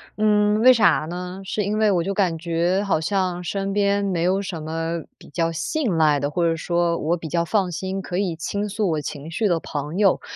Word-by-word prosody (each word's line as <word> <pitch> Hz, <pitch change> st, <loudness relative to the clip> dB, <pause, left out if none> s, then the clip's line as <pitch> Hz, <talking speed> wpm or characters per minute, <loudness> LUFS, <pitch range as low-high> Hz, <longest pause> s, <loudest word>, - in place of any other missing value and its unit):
嗯， 210 Hz, 0 st, +3 dB
为 255 Hz, +2 st, +8 dB
啥 195 Hz, -10 st, +4 dB
呢？ 180 Hz, +2 st, -6 dB
是 200 Hz, +1 st, -2 dB
因 210 Hz, +1 st, -1 dB
为 215 Hz, -1 st, +3 dB
我 180 Hz, -3 st, +2 dB
就 195 Hz, -, -1 dB
感 180 Hz, -5 st, +1 dB
觉 170 Hz, +3 st, 0 dB
好 175 Hz, -5 st, +1 dB
像 180 Hz, -1 st, -1 dB
身 195 Hz, +2 st, -2 dB
边 200 Hz, 0 st, +2 dB
没 180 Hz, -4 st, 0 dB
有 190 Hz, +3 st, +2 dB
什 175 Hz, -5 st, -5 dB
么 165 Hz, +1 st, -3 dB
比 -, -, -16 dB
较 165 Hz, +2 st, -1 dB
信 205 Hz, -, -1 dB
赖 150 Hz, -3 st, +3 dB
的， 145 Hz, -, -1 dB
或 170 Hz, +1 st, 0 dB
者 165 Hz, -, +1 dB
说 170 Hz, +1 st, 0 dB
我 165 Hz, +3 st, 0 dB
比 165 Hz, -, -7 dB
较 170 Hz, +2 st, 0 dB
放 190 Hz, +2 st, 0 dB
心， 190 Hz, +3 st, -4 dB
可 180 Hz, -1 st, -4 dB
以 190 Hz, -3 st, 0 dB
倾 200 Hz, +5 st, -3 dB
诉 210 Hz, -1 st, -1 dB
我 155 Hz, -, -1 dB
情 145 Hz, +1 st, -6 dB
绪 200 Hz, +6 st, 0 dB
的 170 Hz, -2 st, +2 dB
朋 150 Hz, +3 st, -5 dB
友。 200 Hz, -2 st, +3 dB
180 Hz, 245 characters per minute, -23 LUFS, 165-200 Hz, -, 为